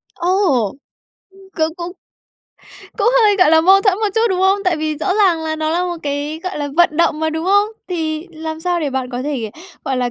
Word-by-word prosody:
Ồ! 350 0 -3 1.0
Ư, 385 - -22 0.3
c - - -12
cũng 345 0 -5 1.1
cũng 425 +1 +3
hơi, 415 -2 +4
gọi 365 -5 +4
là, 320 0 +6
mâu 385 +4 +5
thuẫn 395 -3 +2
một 435 - 0
chút, 450 - +2
đúng 370 -1 -1
không? 385 +1 +3
Tại 365 -3 +2
vì 310 -1 -2
rõ 370 +5 -1
ràng 375 -6 +3
là 315 0 -3
nó 310 0 -1
là 350 +2 0
một 350 -1 -3
cái, 290 +2 -3
gọi 370 -3 -4
là, 290 -1 -3
vận 345 -3 +3
động 320 -2 +1
mà, 315 0 0
đúng 320 +1 -3
không? 405 +3 +3 0.2
Thì 320 -2 -3
làm 315 0 -6
sao 350 0 -1
để 290 -3 -2
bạn 260 -1 -3
có 245 0 -4
thể, 260 -7 -3 0.3
gọi 265 -1 -1
là, 245 -1 -1
325 Hz, 230 wpm, -18 LUFS, 310-370 Hz, 1.1 s, là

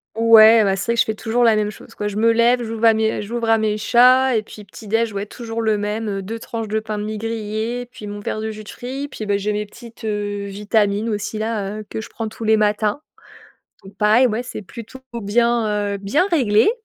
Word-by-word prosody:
ouais, 225 -1 +7
bah, 195 -1 +1
c'est 215 +5 -2
vrai - - +2
que 235 - -2
je - - +5
fais 220 - -3
toujours 240 +2 0
la 225 -2 +5
même 210 0 0
chose - - -15
quoi, 210 - -3
je 205 0 -4
me 230 +1 +4
lève, 240 +2 +3
j'ouvre 225 0 -2
à 225 - +7
me 220 0 0
j'ouvre 230 +2 -3
à 225 - +5
mes 215 -1 -1
chats 255 +3 +5
et 215 - -1
puis 210 0 -12
petit 205 +2 -13
déj, 225 +1 +1
ouais 200 0 -4
toujours 230 +1 -7
le 220 -1 +2
même, 210 +2 -3
heu, 195 -1 -3
2 220 +4 -6
tranches 225 -1 -5
de 220 +1 -1
pain 215 -1 -5
de - - -3
mie 215 0 -4
grillées, 225 +2 -3
puis 230 -5 -10
mon 205 0 -6
verre 215 - -4
de 220 0 -3
jus 215 0 -9
de - - -13
fruits, 270 +3 -6
puis, 220 -6 -7
bah, 200 -1 +1
j'ai 210 +1 -2
mes 210 0 -2
petites, 235 +2 -14
heu, 205 -1 -3
vitamines 205 +1 0
aussi 215 +1 -3
là, 215 -2 -3
heu, 215 - -8
que - - -5
je 220 - -8
prends 225 -1 -5
tous 225 - -9
les 220 0 +4
matins, 210 +5 0 0.8
donc 195 +1 -14
pareil, 220 +5 +4
ouais, 230 +3 -2
c'est 225 - -7
plutôt 230 +6 -11 0.2
bien, 210 -1 +1
heu - - -4
bien 205 - +1
réglé 250 - +3
220 Hz, 250 wpm, -20 LUFS, 210-230 Hz, 0.8 s, ouais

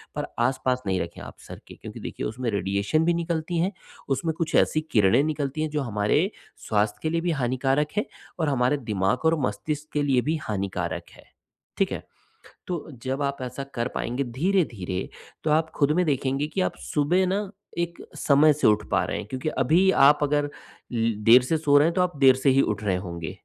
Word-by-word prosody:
पर - - -3 0.2
आसपास 130 -1 0
नहीं 95 -1 +1
रखें 85 - -7
आप - - -10
सर - - -9
के, - - -11
क्योंकि - - -10
देखिए - - -5
उसमें 120 +2 -3
रेडिएशन 100 +10 0
भी 175 - +3
निकलती 170 0 -2
है, 180 +4 +1 0.4
उसमें 160 +4 0
कुछ 160 -2 -1
ऐसी 155 - +3
किरणें 110 +5 +4
निकलती 150 -1 -2
हैं 155 - -1
जो 150 0 -1
हमारे 120 - +1 0.4
स्वास्थ्य 105 0 +1
के 160 - +1
लिए 165 +1 0
भी 175 0 0
हानिकारक 135 +1 0
हैं 210 - +2 0.3
और 160 -3 +1
हमारे 130 +1 +2
दिमाग 100 +8 0
और 160 0 +3
मस्तिष्क 150 0 -4
के 150 - +1
लिए 135 -3 +3
भी 155 +5 0
हानिकारक 100 -2 -3
है। - - -16 0.5
ठीक - - +1
है? - - -4 0.6
तो 175 -3 -4
जब 130 +2 -2
आप 140 0 -1
ऐसा 130 +2 -5
कर 120 0 0
पाएँगे, 125 +4 -1
धीरे-धीरे, 120 - -1 0.4
तो 155 - 0
आप 160 +1 +2
खुद 145 -1 +2
में 180 - +2
देखेंगे 140 0 0
कि 185 +5 -2
आप - - -1
सुबह 170 +6 +2
ना 190 +2 +1 0.4
एक 170 0 -2 0.2
समय 150 +2 +5
से 150 - +2
उठ 105 0 +3
पा - - +3
रहे - - -3
हैं - - -5
क्योंकि 130 +6 -3
अभी 160 +9 +4 0.2
आप 145 +1 +5
अगर 145 0 +1 0.4
ले 115 -1 +1 0.2
देर 125 +2 +9
से 160 +6 0
सो 145 -2 +4
रहे 145 +2 +5
हैं, 170 - -1
तो 185 - +3
आप 180 -4 -1
देर 135 -2 +6
से - - +7
ही 135 +1 +5
उठ 105 -3 -1
रहे 100 -3 +1
होंगे, 85 -2 -5
140 Hz, 205 wpm, -25 LUFS, 120-160 Hz, 0.6 s, देर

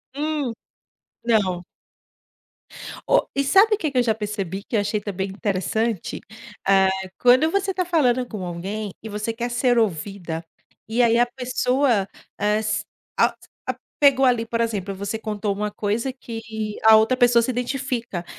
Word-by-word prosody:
Hum, 295 -4 -1 0.7
não. 195 -6 +1 1.5
Ó, - - +3
e 280 - +2
sabe 400 +9 +5
o - - -10
que 310 -8 -2
que 265 - -3
eu 250 - +5
já 225 -2 +2
percebi 200 -3 -4
que 235 - -4
eu 215 - +4
achei 210 +1 -1
também 195 -2 -3
interessante? 205 +1 -2 0.5
Eh, 195 -1 +5 0.3
quando 255 +6 +5
você 395 +1 0
está 365 -1 -1
falando 255 -8 +2
com 210 -6 -6
alguém, 195 +5 -4
e 220 - -6
você 210 +2 -3
quer 240 +1 -3
ser 245 0 +2
ouvida, 175 -4 -1 0.4
e 230 +3 +1
aí 235 0 +4
a 240 - +5
pessoa, 250 -3 0 0.3
eh, 210 +1 +2
se 215 -1 -1 0.4
a - - +4 0.3
a - - -1 0.2
pegou 275 -2 +5
ali 240 -3 +2
por 230 0 -1
exemplo, 200 -4 -2
você 200 +3 -4
contou 210 -2 -2
uma 210 +1 -2
coisa 215 +5 -1
que 230 -3 -7 0.4
a 220 0 +9
outra 220 +4 +4
pessoa 245 -2 +5
se 235 - 0
identifica, 245 -6 -3
225 Hz, 165 wpm, -23 LUFS, 205-250 Hz, 1.5 s, a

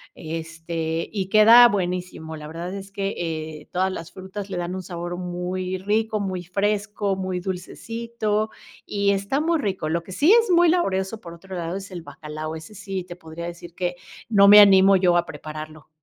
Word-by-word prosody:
este, 165 0 -4
y 195 -4 -2
queda 230 +3 +9
buenísimo. 180 -5 -3
La 150 0 -9
verdad 170 +4 -6
es 195 0 -7
que, 195 0 -2
eh, 155 -2 -5
todas 190 +1 +1
las 165 -3 -7
frutas 195 +1 -7
le - - -4
dan 175 +1 -3
un 190 - -5
sabor 175 0 -5
muy 180 +1 -3
rico, 215 +2 0
muy 185 -3 -3
fresco, 205 +1 -1
muy 185 -1 -3
dulcecito 215 +3 -3 0.4
y 200 -1 0
está 200 +9 0
muy 330 0 +1
rico. 190 - -2
Lo 170 +1 -1
que 190 - -10
sí 305 - +4
es 460 -2 +5
muy 345 -1 +5
laborioso, 215 - 0
por 170 -3 -10
otro 190 +2 -10
lado, 170 +1 -3
es 195 0 -7
el 175 - -6
bacalao, 155 0 -7
ese 160 +6 -10
sí 190 -2 -5
te 175 0 -10
podría 160 0 -8
decir 170 0 -9
que 180 -1 -2 0.3
no 200 -2 +6
me 210 +1 +10
animo 195 -1 +7
yo 180 -2 +4
a 175 - +1
prepararlo. 155 0 -9
185 Hz, 185 wpm, -23 LUFS, 170-205 Hz, 0.4 s, me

